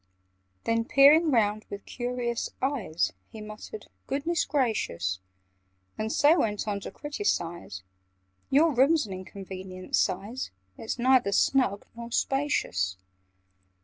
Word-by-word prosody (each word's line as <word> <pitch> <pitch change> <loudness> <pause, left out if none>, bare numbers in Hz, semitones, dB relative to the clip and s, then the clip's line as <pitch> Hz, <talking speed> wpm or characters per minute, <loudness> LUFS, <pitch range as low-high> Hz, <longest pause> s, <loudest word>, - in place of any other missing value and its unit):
Then, 230 0 +1
peering 290 +6 +6
round 215 -5 +1
with 200 0 -7
curious 245 -1 -3
eyes, 255 - -1 0.2
He 220 - -10
muttered 215 - -9 0.2
"Goodness 310 +5 0
gracious!" 215 - 0 0.8
And 220 0 -3
so 300 +7 +5
went 210 -1 -1
on 205 -1 -1
to - - -7
criticise— 175 - -3 0.7
"Your 305 +3 +4
room's 275 +3 +4
an 195 - -7
inconvenient 185 0 -6
size: 205 +8 -1 0.3
It's 225 - -4
neither 250 -4 +4
snug 205 -2 +2
nor 235 0 -7
spacious. 165 - 0
230 Hz, 115 wpm, -28 LUFS, 200-275 Hz, 0.8 s, peering